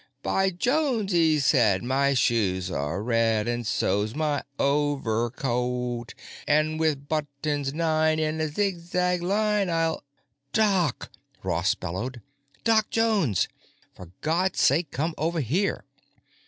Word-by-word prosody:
'By 195 0 +2
Jones,' 240 - 0
he 160 -3 +3
said, 120 -9 +3
'my 135 +2 +1
shoes 95 -7 +1
are 85 +6 -2
red, 115 -2 +1
and 120 -1 -2
so's 105 +2 0
my 150 -2 0 0.2
overcoat, 125 -3 -1 0.3
And 155 +1 +2
with 150 -3 0
buttons 145 -2 -2
nine 155 0 +1
in 155 0 -1
a 155 - +1
zigzag 180 0 -1
line, 205 +1 +1
I'll——'" 165 -1 0 0.5
"Doc!" 195 - +1 0.3
Ross - - +1
bellowed. 120 +9 -5 0.4
"Doc 220 -2 +3
Jones! 210 - +1 0.5
For 90 -3 -11
God's 175 +4 0
sake, 155 +3 +3
come 160 +6 -2
over 165 +2 0
here!" 160 - -1
150 Hz, 115 wpm, -26 LUFS, 120-175 Hz, 0.5 s, he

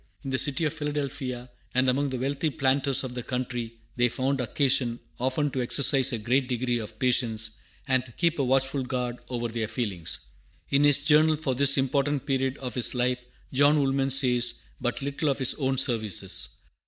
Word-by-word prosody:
In 135 - -4
the 130 - +1
city 145 +2 +1
of 150 - 0
Philadelphia, 140 -5 -4 0.2
and 130 +1 +3
among 140 +3 +2
the 130 - -3
wealthy 140 +5 -1
planters 135 -1 +1
of 130 -2 -5
the 125 - -4
country, 120 -2 -4 0.2
they 120 0 +3
found 130 +3 -1
occasion 125 -2 0 0.2
often 130 +3 0
to 130 - -2
exercise 135 +2 +4
a 120 - -1
great 125 +4 +1
degree 125 -1 -1
of 110 - -8
patience, 115 -4 +1 0.4
and 130 -2 +2
to - - -14
keep 170 +1 0
a - - +2
watchful 135 +1 +1
guard 125 -1 -3
over 120 -2 -2
their 115 -1 -3
feelings. 95 -10 -3 0.5
In 140 +1 +4
his 145 0 +5
Journal 155 +1 +5
for 150 -3 -2
this 140 +2 +4
important 140 +1 0
period 135 -1 0
of 125 -4 -6
his 125 +2 +1
life 125 0 0 0.3
John 145 +3 +5
Woolman 135 -1 +1
says 125 -3 +1 0.2
but 120 +2 -1
little 140 +2 -1
of 135 - 0
his 130 -2 +2
own 135 -1 0
services. 110 - 0
130 Hz, 185 wpm, -27 LUFS, 125-140 Hz, 0.5 s, his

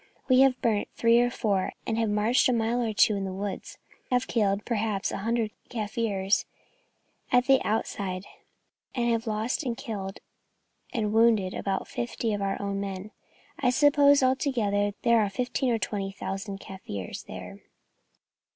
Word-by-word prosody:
We 255 -1 +5
have 265 -1 +5
burnt 215 -3 +1
three 230 0 +4
or 245 - +2
four, 200 -6 -1
have 225 -1 0
marched 215 +6 +3
a - - +3
mile 235 +1 +1
or 230 -2 0
two 210 0 +4
into 195 -1 -2
the 185 - -6
woods, 195 -1 -5 0.3
have 250 -1 +2
killed, 205 -3 0
perhaps, 215 -4 -1
a - - -3
hundred 225 +1 0 0.2
Kaffirs 210 -3 -1 0.8
at 250 0 +4
the 270 0 +5
outside, 200 -3 -2 0.7
and 240 -2 +1
have 230 0 -1
lost 220 +7 -1
in 245 -3 -2
killed 195 -5 -5 0.7
and 210 -3 -1
wounded 220 -4 +4
about 195 -1 -2
fifty 235 -2 -2
of 205 - -2
our 195 0 -1
own 200 0 -2
men. 195 +1 -5 0.5
I 250 - +3
suppose, 285 +1 +5
altogether, 225 -7 +1
there 235 -1 +5
are 210 -2 +2
fifteen 250 +5 -1
or 230 - +2
twenty 195 -1 -3
thousand 195 0 -5
Kaffirs 105 - -7
there. - - -8
220 Hz, 155 wpm, -27 LUFS, 200-240 Hz, 0.8 s, We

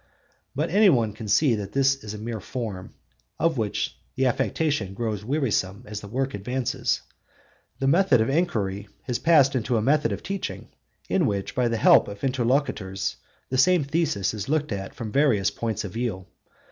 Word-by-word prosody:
But 150 +5 -1
any 205 +2 +6
one 115 - +2
can 110 0 -8
see 135 +5 +4
that 105 -2 -4
this 135 0 +2
is 105 0 -6
a - - -6
mere 110 +1 -5
form, 100 -4 -6 0.4
of 165 -6 +1
which 105 -2 -2 0.2
the 130 - +1
affectation 125 -4 0
grows 110 -2 -3
wearisome 115 -6 -1
as 105 0 -6
the 100 - -9
work 130 +5 -2
advances. 125 +4 -1 0.7
The 135 - -2
method 145 -2 +4
of 110 - +2
enquiry 105 - -1 0.2
has 125 -2 -2
passed 145 -5 +4
into 120 -1 0
a - - +1
method 150 +4 +2
of - - -4
teaching 195 -1 -5 0.4
in - - +2
which 100 -1 -2
by 125 -1 +1
the 115 -1 0
help - - +6
of 100 0 -9
interlocutors 125 -7 0 0.3
the 130 - 0
same 175 +3 +5
thesis 140 - 0
is 105 +1 -5
looked 150 -2 0
at 95 -1 -5
from 110 -2 -5
various 130 -9 +3
points 115 -1 -3
of 100 -3 -6
view. 110 -6 -3
120 Hz, 180 wpm, -25 LUFS, 105-140 Hz, 0.7 s, any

